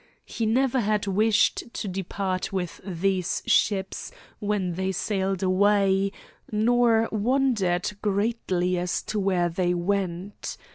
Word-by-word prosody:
He 225 -2 -2
never 260 +3 +2
had 210 -2 0
wished 215 +3 +2
to 210 - -3
depart 185 0 -3
with 180 -3 -4
these 185 0 -1
ships 195 -2 +1 0.3
when 205 -4 -1
they 190 +2 -1
sailed 195 0 -1
away, 195 +1 +3 0.4
nor 225 +1 +3
wondered 215 -6 +1
greatly 195 -4 0
as 175 0 -2
to 215 - -2
where 185 -3 +2
they 175 +1 0
went. 190 +1 -3
195 Hz, 115 wpm, -25 LUFS, 185-215 Hz, 0.4 s, away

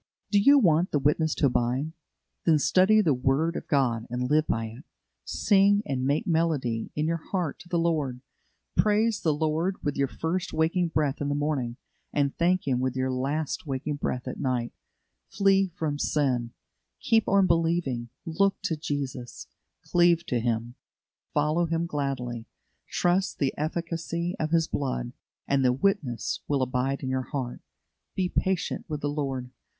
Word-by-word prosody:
Do 205 - +5
you 280 +8 +7
want 175 - +4
the - - +1
witness 150 +3 +1
to - - +2
abide? 130 +4 +1 0.6
Then 160 -2 +6
study 190 +8 +4
the 160 -8 +3
word 135 +6 +1
of - - -5
God, 120 -7 +1
and 125 +2 -2
live 155 +1 +3
by 115 0 0
it; 115 +5 -9 0.4
sing 200 0 +3
and 130 -2 -1
make 145 +10 +1
melody 160 - 0
in 150 - 0
your 165 0 -1
heart 180 -7 -1
to 175 - -14
the 175 - 0
Lord; 150 -7 0 0.5
praise 215 +1 +2
the 160 - +2
Lord 160 +5 -1
with 145 - -1
your 140 0 +2
first 170 +7 -3
waking 165 +3 +1
breath 150 -3 -1
in 145 - -1
the 145 - 0
morning, 140 -5 -1 0.3
and 140 -1 0
thank 180 0 +1
Him 130 -2 +1
with 130 0 -1
your 130 0 0
last 140 +5 -2
waking 140 +2 -2
breath 125 -3 -3
at 130 - -5
night; 125 -4 -1 0.6
flee 195 -1 +3
from 150 -2 -2
sin; 125 -7 0 0.5
keep 225 -1 +2
on 195 0 +4
believing; 165 -8 +1 0.2
look 195 +5 +1
to 175 -5 0
Jesus, 140 - -5 0.4
cleave 175 -1 +3
to 125 - 0
Him, 115 0 -1 0.6
follow 155 +3 +1
Him 165 +1 0
gladly, 135 -7 -3 0.4
trust 180 +2 +1
the 135 -2 0
efficacy 170 +2 -2
of 155 - -1
His 165 0 +2
blood, 125 -3 -2 0.3
and 140 -1 +2
the 125 - +4
witness 140 - 0
will 140 -2 +1
abide 130 +2 -1
in 130 - -2
your 130 -2 -2
heart. 130 -5 -4 0.5
Be 185 -1 +1
patient 190 -1 -1
with 150 -2 -3
the 145 - -1
Lord. 135 -4 -3
150 Hz, 165 wpm, -27 LUFS, 130-170 Hz, 0.6 s, you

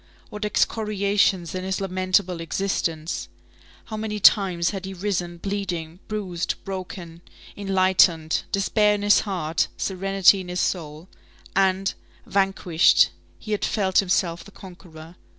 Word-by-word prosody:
What 210 0 -4
excoriations 200 -4 +1
in 185 0 -4
his 190 0 -2
lamentable 185 -2 0
existence! 165 -2 -2 0.6
How 215 - -6
many 215 -1 -3
times 185 -4 +4
he - - -6
had 190 0 -5
risen 175 -3 -2
bleeding, 180 -3 -4
bruised, 190 -6 -3
broken, 180 -3 -7 0.3
enlightened, 185 -5 +2
despair 210 +1 +2
in 205 - -4
his 205 0 +5
heart, 170 -6 -1
serenity 195 0 +3
in 180 - -9
his 180 0 -3
soul! 160 -2 -3 0.5
and, 195 0 +2 0.3
vanquished, 195 -4 +3 0.3
he 215 - -9
had 210 - -1
felt 190 -3 +1
himself 180 -3 0
the - - -14
conqueror. 175 -4 -13
190 Hz, 125 wpm, -24 LUFS, 175-200 Hz, 0.6 s, his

